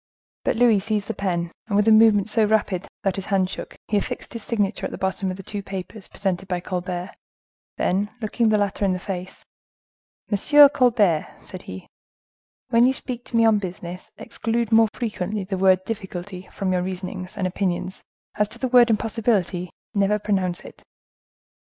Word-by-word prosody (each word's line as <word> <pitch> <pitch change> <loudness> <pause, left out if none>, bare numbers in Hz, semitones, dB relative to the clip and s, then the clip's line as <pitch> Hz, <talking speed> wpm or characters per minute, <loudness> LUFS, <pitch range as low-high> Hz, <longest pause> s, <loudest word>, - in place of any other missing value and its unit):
But - - +1
Louis 230 -3 +4
seized 210 0 -2
the - - 0
pen, 175 -4 -2 0.2
and 205 - -1
with 205 +1 +3
a - - +7
movement 215 -2 +6
so 220 0 +2
rapid 205 -4 +1 0.2
that 195 -1 0
his 195 - -4
hand 190 -1 +1
shook, - - -7
he 210 - +1
affixed 250 +4 -4
his 230 - -5
signature 205 -3 -1
at - - -12
the - - -6
bottom 190 0 -1
of 185 - -4
the 195 - -9
two 205 +2 -4
papers 195 +1 -7
presented 190 -1 -3
by 180 -1 -1
Colbert,—then 180 +2 -4
looking 225 +1 +1
the 215 - +3
latter 205 0 -1
in 195 -2 +2
the - - -1
face,—"Monsieur 200 +8 +1
Colbert," 220 - +2
said 185 -2 -9
he, 95 0 -9 0.8
"when 235 +1 +5
you 260 - +2
speak 245 -2 -3
to 235 - -2
me 230 - +5
on 220 -2 +4
business, 180 -1 -7
exclude 230 0 -2
more 225 0 +6
frequently 210 -4 -3
the 190 +1 -3
word 185 0 +4
difficulty 190 -3 -6
from 190 -2 -2
your 180 - +1
reasonings 185 +1 -5
and 190 - -1
opinions; 185 0 -2 0.3
as 210 0 0
to 230 - -7
the 255 +1 -2
word 245 -1 +6
impossibility, 210 -5 0 0.2
never 200 +1 +2
pronounce 190 -4 -1
it." - - -13
200 Hz, 175 wpm, -23 LUFS, 185-220 Hz, 0.8 s, a